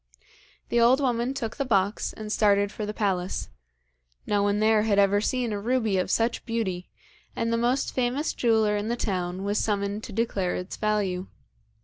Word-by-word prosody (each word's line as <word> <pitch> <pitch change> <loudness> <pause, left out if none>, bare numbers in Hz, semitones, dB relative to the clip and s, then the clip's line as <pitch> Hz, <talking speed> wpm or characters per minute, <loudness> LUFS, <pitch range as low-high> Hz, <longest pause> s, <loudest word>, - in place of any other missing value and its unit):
The 235 - +2
old 245 +4 +5
woman 250 -1 0
took 225 -4 -4
the - - 0
box 200 -5 +1
and 215 -1 -7
started 205 -1 +3
for 210 -1 -5
the - - -2
palace. 190 - -2 0.8
No 205 -1 +1
one 205 0 +1
there 215 0 +4
had 210 -2 +1
ever 200 0 +4
seen 245 -1 -1
a 205 - -2
ruby 220 -3 +1
of 180 - -1
such 230 +1 +1
beauty, 195 -6 -3 0.5
and 230 0 -1
the - - +2
most 245 +3 0
famous 255 +4 0
jeweller 220 -3 +2
in 205 +1 -2
the 235 - 0
town 185 -4 -2
was 205 +1 0
summoned 205 0 -1
to - - -9
declare 200 -4 -1
its 180 +1 -5
value. 200 -4 -1
215 Hz, 185 wpm, -26 LUFS, 200-230 Hz, 0.8 s, old